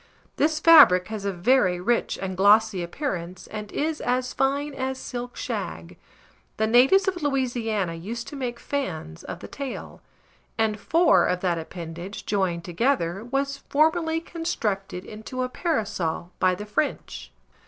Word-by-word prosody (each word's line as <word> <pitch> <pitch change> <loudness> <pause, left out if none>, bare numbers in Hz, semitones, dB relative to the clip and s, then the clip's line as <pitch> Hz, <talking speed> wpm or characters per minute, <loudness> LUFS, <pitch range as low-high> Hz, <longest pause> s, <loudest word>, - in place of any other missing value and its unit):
This 310 +1 +2
fabric 285 - +7
has 215 -2 -5
a 200 - +1
very 185 -1 +2
rich 235 +6 0
and 190 -1 -4
glossy 205 0 +4
appearance 180 - -4
and 210 -1 -7
is 310 +1 -2
as 250 +1 -1
fine 280 +2 0
as 265 0 -3
silk 245 -1 -6
shag. - - -5 0.6
The 220 - +2
natives 260 - +5
of 365 -2 -1
Louisiana 240 - -1
used 225 +8 -6
to - - -8
make 245 -3 -4
fans 160 - -4
of 175 - -7
the - - -8
tail; 280 -2 -7 0.6
and 220 -1 +1
four 335 +9 +4
of 180 0 -1
that 175 -3 0
appendage 170 +3 -7
joined 185 -4 0
together 190 -1 0
was 275 +3 -2
formerly 320 +2 +2
constructed 210 - -3
into 220 +4 -5
a 255 - -2
parasol 205 - -2
by 185 -1 +3
the 210 - -7
French. 155 - -3
225 Hz, 145 wpm, -25 LUFS, 185-275 Hz, 0.6 s, fabric